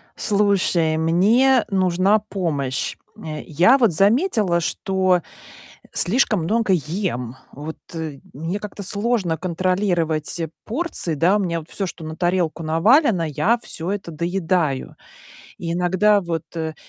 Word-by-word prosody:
Слушай, 195 -6 +2
мне 215 +11 +3
нужна 190 +2 +2
помощь. 155 -11 -3 0.2
Э, 155 -1 -6
я 175 - +4
вот 235 -7 +3
заметила, 205 - +2
что 185 +1 +1 0.7
слишком 215 -1 +1
много 210 +3 +1
ем. 150 - -2 0.2
Вот, 155 +3 -7 0.2
э, 160 -4 -5
мне 165 +8 -4
как-то 205 0 -7
сложно 200 -4 0
контролировать 175 -3 -1 0.3
порции, 250 - -2
да? 170 +7 +3
У - - -1
меня 170 -4 -1
вот 160 - -13
всё, 195 - -2
что 175 -2 -8
на 155 0 -6
тарелку 175 -1 0
навалено, 190 - +3
я 200 - +1
всё 170 -5 -5
это 195 -4 -4
доедаю. 170 -3 -1 0.6
И 165 -1 -3
иногда 185 +4 +3
вот, 170 -4 -3
э, 160 -1 -3
180 Hz, 130 wpm, -21 LUFS, 160-205 Hz, 0.7 s, я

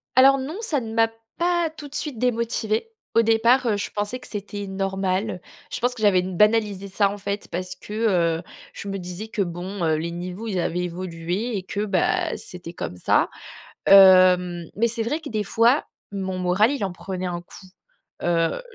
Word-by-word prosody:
Alors 270 +1 +7
non, 280 +7 -5
ça 300 - 0
ne 225 -1 -6
m'a 225 0 +3 0.3
pas 345 -1 +1
tout 300 -2 -10
de 285 - -9
suite 285 -7 -1
démotivée. 230 - 0 0.3
Au 230 - +7
départ, 230 +3 +4
heu, 215 -3 +2
je 205 - -3
pensais 210 +5 -3
que - - -10
c'était 205 -1 -5
normal. 195 0 -2 0.3
Je - - -3
pense 245 +1 0
que 230 - -9
j'avais 200 -4 +4
banalisé 200 +2 +2
ça, 200 +1 +2
en 205 - -5
fait, 200 +1 -4
parce 185 +1 -4
que, 205 +3 -10 0.5
heu, 175 - -10 0.3
je 200 - -8
me 195 0 -3
disais 180 +4 -6
que, 210 - -2
bon, 180 +2 -4
heu, 160 -1 +2
les 170 +2 -3
niveaux, 180 +6 -6
ils 190 -4 -1
avaient 175 +2 -1
évolué 180 +5 -3
et 190 - -5
que, 205 +2 -3
bah, 190 -3 +1
c'était 175 -2 -8
comme 90 - -5
ça. - - +2 0.6
Hem, 185 -2 +7
mais 230 +3 +2
c'est 230 0 -1
vrai 295 +7 -1
que 310 - -8
des 215 -1 -1
fois, 230 +8 +3 0.3
mon 190 -2 -3
moral 185 +5 +3
il 270 -8 -2
en 190 - -2
prenait 185 +1 -5
un 175 -1 -3
coup. 190 +2 -14 0.6
Heu, 165 - +1
200 Hz, 195 wpm, -23 LUFS, 180-230 Hz, 0.6 s, Alors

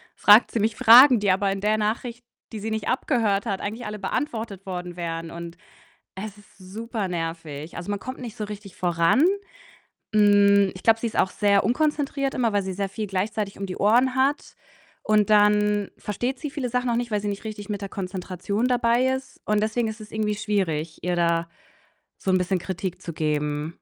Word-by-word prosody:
fragt 210 +3 +6
sie 230 - -1
mich 215 +1 0
Fragen 245 +3 +8
die 205 -2 +2
aber 195 +1 +1
in 195 0 -4
der 210 +1 +2
Nachricht, 230 +3 -3 0.3
die 220 - -5
sie 220 +2 -4
nicht 220 -1 -3
abgehört 220 -6 +1
hat, 195 -4 -2
eigentlich 225 +4 -5
alle 210 0 -6
beantwortet 220 -2 -3
worden 180 -2 -5
wären, 165 -1 -4
und 170 0 -8 0.6
es 205 +2 -7
ist 205 - -21
super 210 +3 -5
nervig. 165 -3 -5
Also, 175 +3 -6
man 205 -1 -2
kommt 255 +5 -7
nicht 235 -4 -7
so 215 - -5
richtig 205 -2 -9
voran. 175 - +2 0.9
Hm, 200 -2 +5
ich 185 - -11
glaube, 225 0 +4
sie 235 - -1
ist 225 - -6
auch 190 - +3
sehr 200 -1 +2
unkonzentriert 280 +2 0
immer, 240 -3 +1
weil 205 -1 +1
sie 190 - -4
sehr 195 +1 -3
viel 210 +2 -5
gleichzeitig 200 +1 -2
um 195 - -4
die 185 -1 -6
Ohren 245 +5 +3
hat 275 +3 0 0.5
und 215 -1 +2
dann 210 -1 +3
versteht 240 +6 -3
sie 295 -3 -5
viele 280 -4 -3
Sachen 250 +1 -1
auch 235 - +1
nicht, 240 -1 -3
weil 210 -1 0
sie 205 - -2
nicht 200 +2 -6
richtig 210 -2 -7
mit 205 -1 -3
der 200 - -4
Konzentration 190 +3 -3
dabei 245 0 +2
ist 265 0 -9
und 210 0 +1
deswegen 225 +2 0
ist 220 0 -6
es 215 - -11
irgendwie 215 -1 -1
schwierig, 170 -7 -2
ihr 180 0 0
da 170 -1 +1 0.7
so 190 - -1
'n 185 - +4
bisschen 185 +1 0
Kritik 185 0 -5
zu 170 - -6
geben. 150 -1 -1
205 Hz, 200 wpm, -24 LUFS, 185-225 Hz, 0.9 s, Fragen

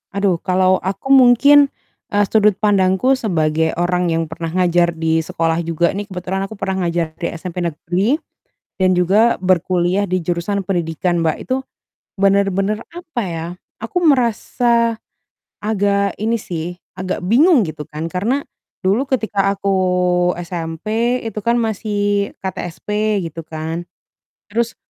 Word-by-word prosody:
Aduh 200 -3 +2
kalau 185 0 +3
aku 195 +7 -4
mungkin, 275 +2 +6 0.4
eee, 205 0 +3
sudut 210 -1 +4
pandangku 205 +4 +3
sebagai 160 -8 0
orang 175 0 +1
yang 165 0 0
pernah 165 0 -5
ngajar 175 -1 +2
di 160 0 0
sekolah 165 +1 -1
juga 170 +2 0
nih 205 - -2
kebetulan 185 +1 -3
aku 220 - -9
pernah 190 -1 -1
ngajar 170 -2 -1
di 170 - -3
SMP 175 +1 -5
negeri 180 - 0 0.6
dan 185 -1 +3
juga 200 +7 +3
berkuliah 185 +2 +1
di 185 -1 -1
jurusan 175 +4 -1
pendidikan, 175 -1 -1
Mbak, 160 -1 +1
itu 255 - -1 0.6
benar-benar, 195 +1 +2
apa 325 -8 -5
ya, 165 -1 -4 0.4
aku 230 +10 -3
merasa 235 -3 +2 0.7
agak 200 -2 +1
ini 225 +2 +1
sih, 175 0 -5 0.2
agak 185 0 -3
bingung 270 - +5
gitu 155 -3 -6
kan 155 +2 -5
karena 230 +10 0 0.4
dulu 200 +8 +2
ketika 205 -6 0
aku 195 0 -2 0.7
SMP 215 +9 -2
itu 220 -2 -4
kan 235 - +3
masih 205 -2 -1
KTSP 210 +3 -2
gitu 165 +1 -9
kan. 160 +2 -5 0.7
Terus 235 0 0
190 Hz, 135 wpm, -18 LUFS, 170-215 Hz, 0.7 s, mungkin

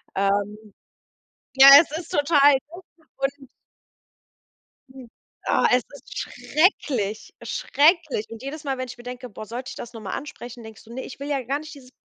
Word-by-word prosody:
Ähm. 205 +2 -1 0.8
Ja, 270 +1 +9
es 310 -1 -6
ist 335 0 -8
total 290 -1 +5 0.2
doof 345 +3 -11 0.3
und 275 0 -4 1.4
Mhm. 260 -3 -13 0.4
Oh, - - +2
es 250 0 +4
ist 280 - -11
schrecklich, 260 - -1
schrecklich. 310 - +1
Und 230 0 -10
jedes 295 +2 -7
Mal, 270 -1 -2
wenn 255 0 -4
ich 245 - -10
mir 240 - -13
denke: 250 0 -8
„Boah, 215 +1 -9
sollte 245 +4 -6
ich - - -8
das 240 - -9
noch 225 - -9
mal 195 - -6
ansprechen?“, 245 -4 -7
denkst 220 -1 -12
du: 230 +1 -13
„Ne, 260 - -5
ich - - -11
will 285 - -4
ja 275 -2 0
gar 275 +4 -2
nicht 310 0 -10
dieses 255 -3 -15
260 Hz, 180 wpm, -24 LUFS, 230-290 Hz, 1.4 s, Ja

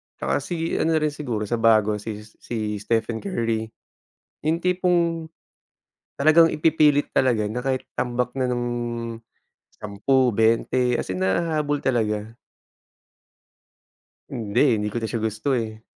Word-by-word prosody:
Tsaka 70 +1 -1
si 165 -1 -3
ano 165 0 +2
na 155 - +2
rin, 150 - +1
siguro 125 -8 -3
sa 115 +3 -2
bago 110 -2 +3
si, 105 0 -6
si 110 -1 -5
Stephen 115 +2 -1
Curry, 115 - -2 0.8
yung 165 +2 0
tipong 175 -3 +1 0.9
talagang 155 +3 +6
ipipilit 150 -2 +3
talaga 115 -5 +2
na 120 +4 -4
kahit 130 -1 -2
tambak 125 0 -2
na 130 -2 0
ng 120 0 -1 1.1
10 125 +6 +1
20 115 +3 +2
as - - -9
in 95 - -2
nahahabol 150 - 0
talaga. 110 -4 -1 1.9
Hindi, 110 0 -1
eh, 140 -4 +5
hindi 105 0 -1
ko - - -5
na - - 0
siya 115 - -1
gusto, 110 +4 -2
eh. 110 -1 -5
120 Hz, 135 wpm, -23 LUFS, 110-150 Hz, 1.9 s, talagang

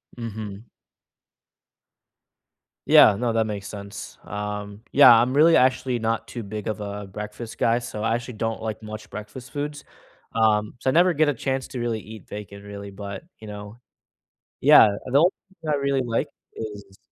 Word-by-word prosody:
Mhm. 110 -2 -7 2.2
Yeah, 100 - +8
no, 120 +1 0
that 115 0 +2
makes 100 -2 -5
sense. 100 -1 -8
Um, 105 0 -5
yeah, 130 -3 +9
I'm 120 +3 +4
really, 160 +4 +6
actually 130 -1 +2
not 115 0 -1
too 120 - -7
big 105 0 -5
of 110 0 -3
a 100 0 -5
breakfast 105 +3 -8
guy, 115 +1 +2
so 120 -3 -6
I 115 +1 +1
actually 120 0 -5
don't 115 +1 -2
like 110 -1 -4
much 110 0 -8
breakfast 105 +5 -9
foods. 145 +1 -4 0.5
Um, 105 -2 +2
so 130 - 0
I - - +2
never 180 +2 +5
get 155 -1 +2
a 145 - +2
chance 135 +1 -2
to 125 - -5
really 115 -2 -1
eat 110 -2 -12
bacon 100 -1 -8
really, 100 0 -8
but, 100 0 -7 0.2
you 110 - -11
know. 105 +1 -8 0.8
Yeah, - - +8 0.2
the 130 +2 +2
only 175 +4 +5 0.3
thing 155 - -2
I - - +3
really 140 -1 0
like 115 -1 -1 0.2
is 105 -3 -8
110 Hz, 170 wpm, -24 LUFS, 105-125 Hz, 2.2 s, yeah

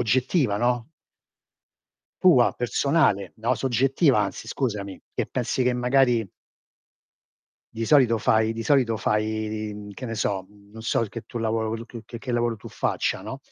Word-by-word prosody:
oggettiva, 125 - +1
no? 120 +3 0 1.3
Tua, 160 -10 +6
personale, 125 - +1
no, 115 +3 0
soggettiva 135 +4 +2
anzi - - -3
scusami, 105 -7 -3
che - - -1
pensi 130 - -1
che 125 - +2
magari 125 -4 +2 1.4
Di 115 0 -3
solito 125 -5 +4
fai 110 0 +2
di 115 0 -5
solito 125 -4 +3
fai 105 0 +1
i 110 0 -3
i, 105 - -6
mhmm, 105 0 -9
che 125 - -8
ne 115 -2 -4
so, 100 -2 -1
mhmm, 100 0 -21
non 110 0 -10
so 115 - +1
che 115 +1 -5
tu 120 - -7
lavoro 115 0 -1
che 115 -1 -10
che 115 0 -8
che 125 +1 -5
lavoro 120 -1 0
tu - - -13
faccia, - - -1
no, - - -6
115 Hz, 165 wpm, -25 LUFS, 110-125 Hz, 1.4 s, Tua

